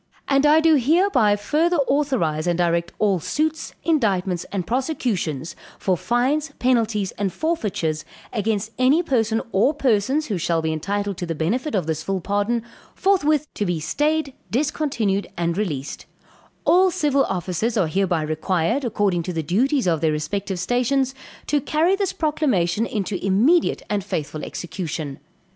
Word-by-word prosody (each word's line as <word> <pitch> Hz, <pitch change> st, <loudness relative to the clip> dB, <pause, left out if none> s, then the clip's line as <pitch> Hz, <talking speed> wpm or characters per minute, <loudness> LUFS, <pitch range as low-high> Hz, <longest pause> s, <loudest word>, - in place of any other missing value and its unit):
"And 275 Hz, +1 st, +3 dB
I 310 Hz, +2 st, +6 dB
do 320 Hz, -1 st, +5 dB
hereby 270 Hz, -, +3 dB
further 310 Hz, -, +1 dB
authorize 240 Hz, -, 0 dB
and 175 Hz, -1 st, +1 dB
direct 170 Hz, -1 st, +1 dB
all 200 Hz, -4 st, +2 dB
suits, 310 Hz, -, -2 dB
indictments, 195 Hz, -, +1 dB
and 190 Hz, -3 st, -4 dB
prosecutions, 210 Hz, -, -2 dB, 0.2 s
for 185 Hz, -, +1 dB
fines, 270 Hz, -, 0 dB
penalties, 225 Hz, -6 st, +1 dB
and 200 Hz, -2 st, 0 dB
forfeitures, 195 Hz, -, -1 dB, 0.3 s
against 215 Hz, -1 st, -1 dB
any 275 Hz, +7 st, +4 dB
person 225 Hz, -7 st, +1 dB
or 240 Hz, +10 st, +3 dB
persons, 265 Hz, +3 st, +1 dB
who 200 Hz, -9 st, -2 dB
shall 165 Hz, 0 st, +1 dB
be 160 Hz, 0 st, -1 dB
entitled 200 Hz, +4 st, -2 dB
to 175 Hz, -, -4 dB
the 165 Hz, -, -2 dB
benefit 225 Hz, -, -1 dB
of 185 Hz, -5 st, 0 dB
this 160 Hz, -1 st, -2 dB
full 195 Hz, +3 st, -2 dB
pardon, 205 Hz, +5 st, -1 dB, 0.3 s
forthwith 310 Hz, -6 st, +2 dB
to -, -, -2 dB
be 175 Hz, -4 st, -1 dB
stayed, 295 Hz, -, 0 dB, 0.2 s
discontinued 235 Hz, -7 st, 0 dB
and 170 Hz, -1 st, 0 dB
released: 155 Hz, -9 st, -4 dB, 0.6 s
All 370 Hz, +2 st, +5 dB
civil 290 Hz, -5 st, +2 dB
officers 185 Hz, +5 st, -2 dB
are 190 Hz, -, +3 dB
hereby 175 Hz, -1 st, 0 dB
required, 170 Hz, -, 0 dB
according 205 Hz, -7 st, +1 dB
to 180 Hz, +2 st, -4 dB
the 160 Hz, -1 st, -2 dB
duties 255 Hz, -, +1 dB
of 165 Hz, -4 st, +1 dB
their 160 Hz, -1 st, +2 dB
respective 185 Hz, +6 st, -2 dB
stations, 250 Hz, +7 st, +1 dB, 0.3 s
to 290 Hz, 0 st, +1 dB
carry 325 Hz, +8 st, +2 dB
this 390 Hz, -2 st, -1 dB
proclamation 230 Hz, -, 0 dB
into 205 Hz, -5 st, -3 dB
immediate 235 Hz, -, +3 dB
and 205 Hz, -2 st, -1 dB
faithful 155 Hz, -5 st, -4 dB
execution. 160 Hz, -5 st, -5 dB
210 Hz, 150 wpm, -22 LUFS, 175-280 Hz, 0.6 s, I